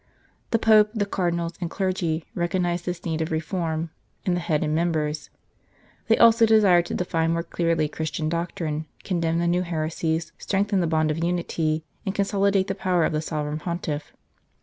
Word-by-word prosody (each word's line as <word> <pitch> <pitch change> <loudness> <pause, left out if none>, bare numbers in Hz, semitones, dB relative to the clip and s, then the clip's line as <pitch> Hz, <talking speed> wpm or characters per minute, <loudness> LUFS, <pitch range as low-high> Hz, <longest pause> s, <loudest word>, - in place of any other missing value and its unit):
The 230 - +3
Pope, 215 -1 +5
the 205 -2 +1
Cardinals 170 -3 -1
and 170 - -2
clergy, 175 -5 -1
recognized 175 0 -1
this 175 0 -4
need 160 -1 -1
of 160 - -1
reform 160 0 -2 0.3
"in 185 - +2
the 175 - 0
head 160 -3 0
and 155 0 0
members"; 155 -2 -1 0.8
they 225 - +4
also 230 0 +6
desired 195 -6 +5
to - - -3
define 165 -2 0
more 170 0 -1
clearly 165 -3 0
Christian 155 +1 -3
doctrine, 165 -2 -2 0.2
condemn 170 -3 0
the 170 - +1
new 175 +1 +2
heresies, 160 -1 -2
strengthen 200 0 0
the 175 - +1
bonds 155 -1 +2
of 165 +2 -2
unity, 165 -2 -1 0.2
and 195 0 -3
consolidate 200 -1 +2
the 195 - -2
power 185 -3 +1
of - - -1
the 155 - 0
Sovereign 150 -1 -3
Pontiff. 160 -3 -4
170 Hz, 170 wpm, -25 LUFS, 160-185 Hz, 0.8 s, also